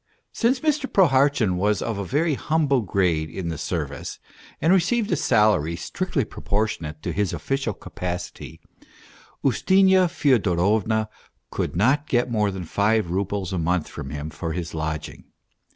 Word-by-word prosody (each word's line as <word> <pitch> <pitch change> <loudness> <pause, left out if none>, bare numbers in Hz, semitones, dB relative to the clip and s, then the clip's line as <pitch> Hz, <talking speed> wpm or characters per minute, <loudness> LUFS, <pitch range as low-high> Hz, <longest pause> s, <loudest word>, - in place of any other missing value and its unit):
Since 250 +2 +1
Mr. 300 -3 0
Prohartchin 135 - +3
was 105 +1 +1
of 115 -3 -3
a - - -2
very 150 - +1
humble 145 -2 +1
grade 90 -6 0
in 85 -1 -5
the 80 - -4
service, 75 -4 -4 0.4
and 165 +4 +3
received 210 +5 +2
a - - +3
salary 105 - +2
strictly - - -2
pro - - -11
portionate 90 -7 -2
to - - -2
his 105 -2 0
official 135 -6 -2
capacity, 90 -1 -6 0.8
Ustinya 190 +6 +4
Fyodorovna 110 - +2 0.4
could - - -3
not 130 - +2
get 120 0 +1
more 105 -3 +2
than 95 -2 -5
five 105 +1 +1
roubles 95 0 -2
a 90 - -1
month 85 0 0
from 65 - -7
him 75 +2 -5
for 80 +2 -4
his 85 -1 -5
lodging. 80 -1 -4
105 Hz, 150 wpm, -24 LUFS, 90-140 Hz, 0.8 s, Ustinya